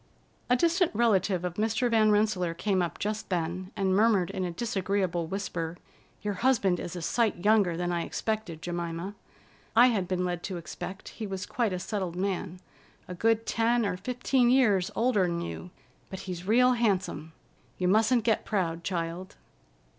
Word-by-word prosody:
A 250 - +5
distant 340 +6 +3
relative 200 -5 +2
of 180 - -2
Mr. 225 +3 +1
Van 220 -2 +4
Rensselaer 205 -5 +1
came 190 +1 0
up 175 - -2
just 215 +1 -3
then 180 +1 -2
and 190 -2 +1
murmured 205 -4 +3
in 190 - -3
a 180 - -1
disagreeable 190 -3 -1
whisper: 175 -3 -4 0.5
"Your 205 -1 -1
husband 205 -9 +3
is 175 - -6
a 175 - -5
sight 210 -2 0
younger 205 -6 +4
than 175 0 -1
I 170 -1 0
expected, 215 -8 -3
Jemima! 175 +2 -4 0.6
I 245 +2 +7
had 200 -6 0
been 180 0 -1
led 175 -1 -2
to 190 -2 -4
expect 190 +3 -7
he 220 - -6
was 190 -1 -4
quite 235 -6 -1
a 185 - -2
settled 185 -2 -3
man, 185 -1 -2 0.5
a 180 - -6
good 225 +4 +1
ten 230 0 +1
or 190 -3 -1
fifteen 245 +4 +1
years 210 -8 +3
older'n 195 -8 +1
you, 175 +1 -6 0.4
but 190 - -6
he's 180 -1 -6
real 250 +4 +5
handsome. 185 -9 -1 0.4
You 180 - 0
mustn't 220 +5 +3
get 225 -1 +1
proud, 170 -5 -1
child." 175 +1 -4
195 Hz, 170 wpm, -28 LUFS, 175-220 Hz, 0.6 s, I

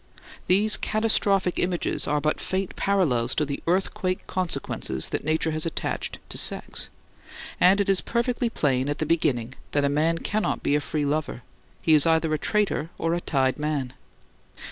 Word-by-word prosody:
These 210 +4 +3
catastrophic 200 -4 +1
images 180 -1 -1
are 150 - +1
but 155 +1 0
faint 190 0 -2
parallels 135 -12 +1
to 150 - +1
the 140 0 -4
earthquake 185 +1 0
consequences 175 - -2
that - - -2
Nature 160 +1 +1
has 155 0 0
attached 165 - -3
to - - -1
sex; - - -2 0.7
and 190 +3 +5
it 200 - +1
is 195 -2 +2
perfectly 235 0 0
plain 135 - 0
at 145 - -1
the 155 - -1
beginning 130 -7 0 0.2
that 145 -1 +2
a - - +2
man 155 +4 +1
cannot 210 +5 -1
be - - +1
a 150 - +1
free 150 0 -2
lover; 145 -3 -2 0.4
he 160 - +4
is 150 0 +6
either 160 -1 +2
a 155 - 0
traitor 205 -7 0
or 165 0 0
a 175 - -1
tied 135 -3 0
man. 145 -4 -2
160 Hz, 170 wpm, -25 LUFS, 145-190 Hz, 0.7 s, is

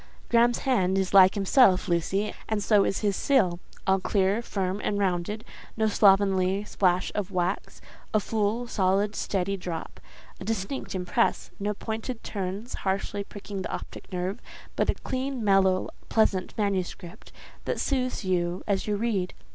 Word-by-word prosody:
Graham's 235 0 +4
hand 195 -8 +2
is 190 0 -1
like 190 0 +7
himself, 195 -1 +4
Lucy, 190 +5 0 0.2
and 215 -2 0
so 205 -1 +4
is 195 - -1
his 205 -2 +1
seal—all 190 -5 +1
clear, 195 +3 +1
firm, 195 -3 -2
and 205 - 0
rounded—no 205 +3 -2
slovenly 195 -2 +3
splash 185 -3 +1
of 205 -2 -2
wax—a 185 +3 -3
full, 220 +3 -1
solid, 200 -1 +1
steady 195 0 -1
drop—a 175 +1 -9
distinct 215 +3 -3
impress; 185 +6 0
no 205 +1 -1
pointed 225 +3 -5
turns 200 +3 -4
harshly 195 +1 -1
pricking 200 -1 -7
the - - -4
optic - - -7
nerve, 185 +5 -3 0.3
but - - +1
a - - +2
clean, 260 -2 -3
mellow, 195 -2 +3 0.2
pleasant 195 -4 +1
manuscript, 195 -2 -3 0.3
that - - -2
soothes 255 -6 -1
you 175 -1 0
as 200 -1 -1
you 210 - +1
read. 205 -4 -1
200 Hz, 140 wpm, -27 LUFS, 185-215 Hz, 0.3 s, like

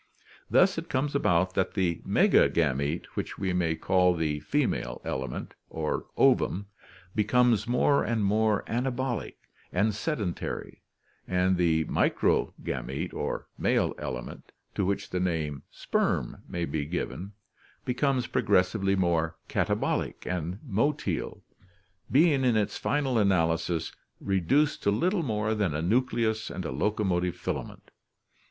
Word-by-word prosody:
Thus 185 -3 +4
it 165 - -9
comes 140 +2 0
about 90 -9 +2
that 95 - 0
the 90 -4 0
megagamete, 75 0 +2
which - - -4
we 95 -2 -1
may 85 -3 +1
call 90 +1 +3
the 75 -3 -1
female - - -1
element 65 -2 -4 0.2
or 80 -1 -3
"ovum," 100 +3 +3 0.5
becomes 115 0 +3
more 125 +4 +3
and 110 -3 0
more 105 +1 +2
anabolic 125 0 -2 0.4
and 105 +4 +1
sedentary, 105 - -3 0.5
and 90 0 +2
the 80 -3 +2
microgamete 65 -3 0
or - - -3
male - - +2
element, 60 -2 -6 0.2
to 95 - 0
which 100 - -2
the 90 - -1
name 80 -6 -1
"sperm" - - -1
may 85 -1 -2
be 75 -1 -2
given, 90 +3 -4 0.5
becomes 130 0 +1
progressively 95 0 +2
more 85 -4 +1
katabolic - - -1
and 90 0 -3
motile, 125 +8 -1 0.7
being 145 -1 +4
in 120 -3 +3
its 105 - 0
final 135 -5 0
analysis 85 -4 +1 0.3
reduced 125 - +1
to - - +2
little 175 - +1
more 110 -6 0
than 100 -8 0
a 75 - -1
nucleus 110 +1 +1
and 90 0 -5
a - - -3
locomotive 90 -5 0
filament. - - -5
95 Hz, 125 wpm, -28 LUFS, 85-120 Hz, 0.7 s, Thus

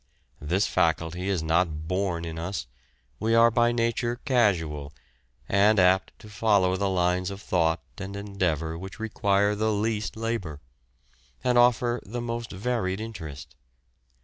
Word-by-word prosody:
This 90 +8 +1
faculty 85 +1 0
is 90 -5 0
not 80 -1 0
born 90 -2 -1
in 80 -1 -5
us; 85 -3 -4 0.5
we 115 +1 +1
are 115 0 +6
by 120 +1 +3
nature 120 0 0
casual, 80 - +1 0.5
and 105 +2 +4
apt 95 +1 +3
to - - -14
follow 105 -3 +2
the 100 +1 0
lines 90 0 +1
of 100 0 -7
thought 85 -4 0 0.2
and 100 0 -6
endeavour 85 -6 -2
which 95 +1 -9
require 100 -2 +1
the 110 +1 0
least 110 +1 -1
labour, 110 -10 -3 0.8
and 125 -1 +2
offer 120 0 +3
the 120 +5 -5
most 115 -1 -4
varied 100 -2 -2
interest. 80 -10 -8
100 Hz, 140 wpm, -26 LUFS, 85-110 Hz, 0.8 s, are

